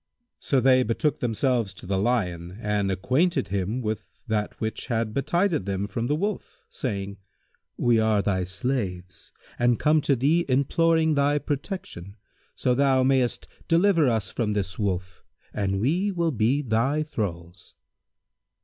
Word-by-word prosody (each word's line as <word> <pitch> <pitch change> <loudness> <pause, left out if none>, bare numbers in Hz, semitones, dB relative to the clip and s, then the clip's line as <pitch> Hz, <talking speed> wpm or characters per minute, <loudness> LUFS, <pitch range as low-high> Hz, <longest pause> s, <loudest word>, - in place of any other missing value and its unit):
So 135 - +1
they 130 0 +5
betook 130 +6 0
themselves 115 -3 0
to - - -12
the 95 +1 -1
Lion 90 -6 -1
and 105 -2 0
acquainted 130 - +1
him 100 +6 -2
with 110 -2 -3 0.2
that 110 -3 -2
which 110 0 -3
had 115 -2 -1
betided 170 - 0
them 100 0 -1
from 115 +3 -3
the 145 - +1
Wolf, 200 +5 -4
saying, 100 -5 -4 0.6
"We 120 -2 +3
are 110 -2 +2
thy 95 -2 0
slaves 95 -3 -4 0.3
and 120 -1 +3
come 155 0 +3
to 140 - +2
thee 150 +8 +2
imploring 160 +4 +2
thy 145 0 +2
protection, 140 - -5 0.4
so 125 - +1
thou 135 0 +3
mayst 130 -2 +1 0.2
deliver 165 -4 +4
us 110 -5 -1
from 105 -3 -1
this 95 -1 -3
Wolf, 90 -3 -3 0.3
and 95 -1 -1
we 175 - +1
will 170 -3 0
be 130 +4 +1
thy 130 +6 +1
thralls." 90 - -6
120 Hz, 145 wpm, -25 LUFS, 100-140 Hz, 0.6 s, they